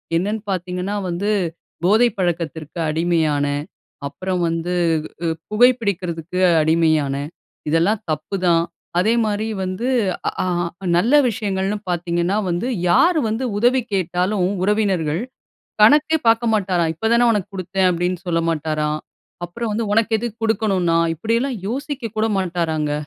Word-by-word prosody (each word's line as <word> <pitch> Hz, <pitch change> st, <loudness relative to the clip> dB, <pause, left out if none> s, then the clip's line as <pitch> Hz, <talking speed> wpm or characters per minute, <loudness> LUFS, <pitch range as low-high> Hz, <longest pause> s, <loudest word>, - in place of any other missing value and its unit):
என்னென்னு 205 Hz, +5 st, -1 dB
பாத்தீங்கன்னா 180 Hz, +2 st, -3 dB
வந்து, 190 Hz, +5 st, -2 dB, 0.5 s
"போதை 215 Hz, +7 st, +5 dB
பழக்கத்திற்கு 165 Hz, -2 st, -3 dB
அடிமையானேன், 150 Hz, -3 st, 0 dB, 0.4 s
அப்புறம் 180 Hz, +5 st, -3 dB
வந்து, 165 Hz, +2 st, -2 dB, 0.5 s
உ -, -, -1 dB
உ -, -, -10 dB, 0.2 s
புகை 245 Hz, +4 st, +6 dB
பிடிக்கிறதுக்கு 180 Hz, -4 st, -3 dB, 0.2 s
அடிமையானேன் 155 Hz, -3 st, +1 dB, 0.4 s
இதெல்லாம் 175 Hz, +7 st, +2 dB
தப்புதான்."அதேமாரி 180 Hz, +6 st, 0 dB, 0.2 s
வந்து 185 Hz, +7 st, -3 dB, 0.4 s
அ, -, -, +4 dB
ஆ, -, -, -2 dB, 0.5 s
நல்ல 230 Hz, +10 st, +2 dB, 0.2 s
விஷயங்கள்னு 200 Hz, -2 st, -2 dB
பாத்தீங்கன்னா 175 Hz, +2 st, 0 dB
வந்து, 175 Hz, +8 st, -1 dB, 0.2 s
யாரு 340 Hz, -, +4 dB
வந்து 225 Hz, +4 st, -2 dB
உதவி 245 Hz, +4 st, +3 dB
கேட்டாலும் 185 Hz, +1 st, 0 dB, 0.2 s
உறவினர்கள், 190 Hz, -6 st, +1 dB, 0.6 s
கணக்கே 295 Hz, +7 st, +5 dB
பாக்க 225 Hz, +1 st, +3 dB
மாட்டாராம். 185 Hz, -5 st, +1 dB
"இப்ப 220 Hz, +8 st, -1 dB
தானே 240 Hz, +1 st, +4 dB
உனக்கு 205 Hz, -3 st, -1 dB
குடுத்தேன்" 190 Hz, 0 st, 0 dB
அப்படின்னு 180 Hz, +1 st, -1 dB
சொல்ல 165 Hz, -1 st, +1 dB
மாட்டாராம். 155 Hz, -1 st, -1 dB, 0.5 s
அப்புறம் 220 Hz, +6 st, -4 dB
வந்து, 225 Hz, +2 st, -1 dB
"உனக்கு 225 Hz, +1 st, +2 dB
எதுக்கு 230 Hz, -1 st, -5 dB
குடுக்கணும் 200 Hz, -5 st, +1 dB
நான்?" 165 Hz, 0 st, +3 dB
இப்படியெல்லாம் 230 Hz, -, -1 dB
யோசிக்க 260 Hz, -3 st, -4 dB
கூட 220 Hz, +1 st, +2 dB
மாட்டாராங்க. 165 Hz, -5 st, -1 dB
185 Hz, 120 wpm, -20 LUFS, 165-215 Hz, 0.6 s, புகை